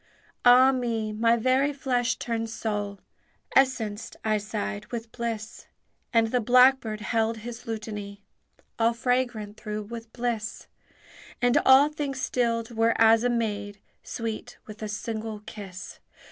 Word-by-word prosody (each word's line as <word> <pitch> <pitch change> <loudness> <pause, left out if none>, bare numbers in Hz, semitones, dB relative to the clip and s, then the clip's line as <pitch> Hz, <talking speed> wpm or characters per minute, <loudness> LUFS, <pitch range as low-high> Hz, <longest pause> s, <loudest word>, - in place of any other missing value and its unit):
"Ah 250 +2 +7
me! 230 -4 -2
my 230 +2 +3
very 260 +4 +2
flesh 255 -3 0
turns 225 -1 -3
soul, 205 -3 -3 0.5
Essenced," 230 -5 +1
I 215 -1 +2
sighed, 100 - -4
"with 230 -1 -6
bliss!" 225 -2 -5 0.4
And 230 -1 +3
the 250 - +2
blackbird 250 -2 +4
held 225 +1 0
his 235 +2 -8
lutany, 210 -2 -6 0.6
All 230 +1 +3
fragrant 235 -3 -1
through 210 -1 -5
with 225 +1 -9
bliss; 235 -3 -3 0.7
And 245 0 +3
all 270 +3 +8
things 290 -3 -4
stilled 235 -3 0
were 230 0 +2
as 225 0 +6
a 245 - +2
maid 205 -4 -2 0.2
Sweet 225 -2 -5
with 215 0 -11
a 215 - -3
single 215 0 -4
kiss. 190 -4 -9
225 Hz, 130 wpm, -26 LUFS, 215-245 Hz, 0.7 s, all